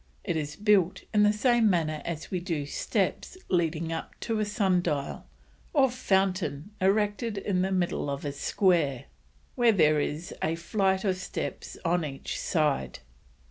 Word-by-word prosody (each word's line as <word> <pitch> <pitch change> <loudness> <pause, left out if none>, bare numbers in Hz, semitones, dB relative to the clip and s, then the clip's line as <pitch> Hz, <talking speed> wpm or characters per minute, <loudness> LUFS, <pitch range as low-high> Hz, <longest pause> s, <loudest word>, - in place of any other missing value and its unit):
It 170 - -1
is 150 -1 -3
built 200 -2 +2
in 210 - +4
the 210 0 +6
same 235 0 +3
manner 155 -4 0
as 165 -2 -5
we 185 - 0
do 165 -5 -3
steps 150 - -2
leading 165 -2 0
up 165 - -6
to 225 -2 -1
a 215 - +1
sun 200 -4 +2
dial 150 -5 -3 0.5
or 270 -5 +4
fountain 190 - 0
erected 205 +3 +1
in 190 -2 0
the 190 +1 0
middle 175 -5 0
of 140 +1 -4
a 145 - -1
square, 145 -3 +1 0.5
where 240 -3 +4
there 155 -6 +4
is 150 +3 -3
a 160 +1 0
flite 190 +2 0
of 190 -3 +1
steps 185 - -5
on 175 0 +2
each 135 -3 -5
side. 150 - 0
180 Hz, 160 wpm, -28 LUFS, 155-205 Hz, 0.5 s, the